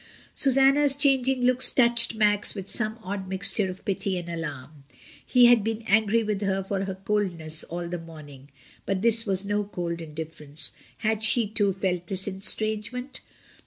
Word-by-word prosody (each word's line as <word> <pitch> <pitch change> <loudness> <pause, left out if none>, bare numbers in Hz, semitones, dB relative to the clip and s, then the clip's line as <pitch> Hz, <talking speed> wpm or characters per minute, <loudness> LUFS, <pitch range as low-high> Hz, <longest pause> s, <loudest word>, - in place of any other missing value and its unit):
Susanna's 275 +1 +4
changing 265 -2 +1
looks 255 0 +7
touched 235 -2 +3
Max 210 -1 +1
with 195 -2 -7
some 220 +1 +1
odd 195 0 -6
mixture 190 +1 +1
of 185 +1 -10
pity 195 -1 -2
and 175 -1 -7
alarm. 150 -3 -8 0.4
He 250 -1 +4
had 240 -3 +5
been 225 +1 -4
angry 220 +1 +2
with 210 -2 -3
her 195 -1 -1
for 195 0 -3
her 190 -1 -5
coldness 185 -6 -1
all 175 +1 -6
the 175 0 -5
morning. 145 -4 -13 0.4
But 195 0 -2
this 230 -1 +3
was 195 0 +1
no 205 +1 -1
cold 175 -4 -5
indiff*erence. 155 -1 -5 0.3
Had 220 0 0
she, 225 +1 +3
too, 205 -1 0
felt 180 -2 -3
this 190 +1 -2
estrangement? 220 +6 -1
200 Hz, 160 wpm, -25 LUFS, 180-230 Hz, 0.4 s, looks